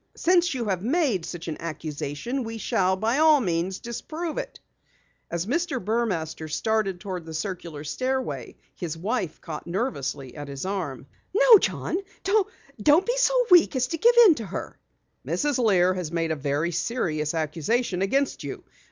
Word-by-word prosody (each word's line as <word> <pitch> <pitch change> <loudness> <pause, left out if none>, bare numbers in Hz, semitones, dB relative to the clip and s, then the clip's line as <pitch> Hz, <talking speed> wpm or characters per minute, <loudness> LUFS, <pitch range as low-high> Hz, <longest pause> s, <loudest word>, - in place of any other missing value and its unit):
Since 345 -3 +3
you 240 -3 -2
have 190 -4 -1
made 245 - +1
such 175 -1 -7
an 160 - -3
accusation 160 - -4
we 225 0 -5
shall 190 -3 +1
by 225 +8 0
all 310 -1 +6
means 180 -3 -1
disprove 310 +7 -5
it." - - -7 0.7
As 170 +1 -2
Mr. 295 - -1
Burmaster 185 -8 -2
started 215 0 0
toward 185 -3 -5
the 160 0 -8
circular 165 -3 -5
stairway, 260 - -3 0.2
his 165 -3 -5
wife 195 -2 -2
caught 160 -2 -7
nervously 140 - -3
at 145 -1 -7
his 140 +3 -6
arm. 180 -10 -3 0.3
"No, 475 -1 +8
John! 360 - -1 0.8
Don't 305 +5 +5
be 485 +1 0
so - - +3
weak 350 -4 +7
as 255 -1 +2
to 330 - -3
give 475 +5 +5
in 375 - +8
to 230 -7 -6
her!" 190 - -6 0.4
"Mrs. 290 -4 0
Lear 185 -4 +4
has 180 -4 -4
made 165 -1 -1
a - - +1
very 145 +3 -1
serious 165 -5 -1
accusation 175 - -1
against 270 +8 0
you. - - -6
195 Hz, 160 wpm, -25 LUFS, 165-265 Hz, 0.8 s, No